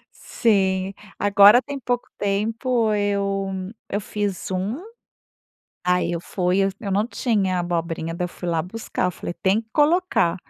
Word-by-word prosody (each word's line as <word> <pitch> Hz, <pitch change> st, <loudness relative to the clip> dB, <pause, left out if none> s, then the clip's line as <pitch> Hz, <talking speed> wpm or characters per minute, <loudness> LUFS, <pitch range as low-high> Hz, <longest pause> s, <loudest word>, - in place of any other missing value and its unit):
Sim. 195 Hz, -4 st, +1 dB, 0.3 s
Agora 205 Hz, +4 st, +7 dB
tem 285 Hz, 0 st, -6 dB
pouco 245 Hz, -1 st, -2 dB
tempo 220 Hz, +3 st, 0 dB
eu 195 Hz, -2 st, -1 dB, 0.2 s
eu 205 Hz, -, -1 dB
fiz 205 Hz, -2 st, -3 dB
um. 200 Hz, -, -2 dB, 1.0 s
Aí 180 Hz, -1 st, +2 dB
eu 170 Hz, -, -2 dB
fui 180 Hz, +1 st, 0 dB
eu 195 Hz, -, +2 dB
eu 200 Hz, -, -4 dB
não 205 Hz, +3 st, +1 dB
tinha 205 Hz, -7 st, 0 dB
abobrinha. 165 Hz, -1 st, -2 dB
Daí 180 Hz, +1 st, -2 dB
eu -, -, -3 dB
fui 175 Hz, 0 st, -7 dB
lá 165 Hz, -2 st, +1 dB
buscar. 220 Hz, +4 st, -4 dB
Eu -, -, +1 dB
falei: 175 Hz, -, -6 dB
"Tem 195 Hz, +3 st, +3 dB
que 225 Hz, -, -18 dB
colocar". 305 Hz, -, +3 dB
200 Hz, 155 wpm, -23 LUFS, 180-220 Hz, 1.0 s, Agora